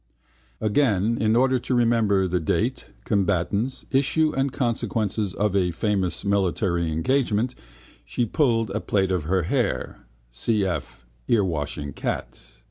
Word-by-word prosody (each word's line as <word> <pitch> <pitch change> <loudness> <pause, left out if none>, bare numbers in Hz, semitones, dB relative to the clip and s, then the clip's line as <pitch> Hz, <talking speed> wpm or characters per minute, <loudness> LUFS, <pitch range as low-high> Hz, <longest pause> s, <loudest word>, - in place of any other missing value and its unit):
Again, 110 -2 +1
in 110 0 +3
order 130 +1 +3
to 125 - -1
remember 115 -5 +3
the 90 0 0
date, 80 - -1 0.2
combatants, 100 - 0
issue 150 +3 +2
and 135 0 0
consequences 110 -5 -1
of 105 -1 0
a 90 -2 +2
famous 95 +1 -1
military 90 -4 +1
engagement 120 - +1 0.5
she 120 - -1
pulled 115 -4 +1
a 105 - -1
plait 95 -3 0
of 90 -5 -1
her 90 +2 +1
hair 80 - -2 0.3
(cf 95 - -1 0.3
earwashing 75 - 0
cat). - - -4
105 Hz, 125 wpm, -24 LUFS, 90-120 Hz, 0.5 s, in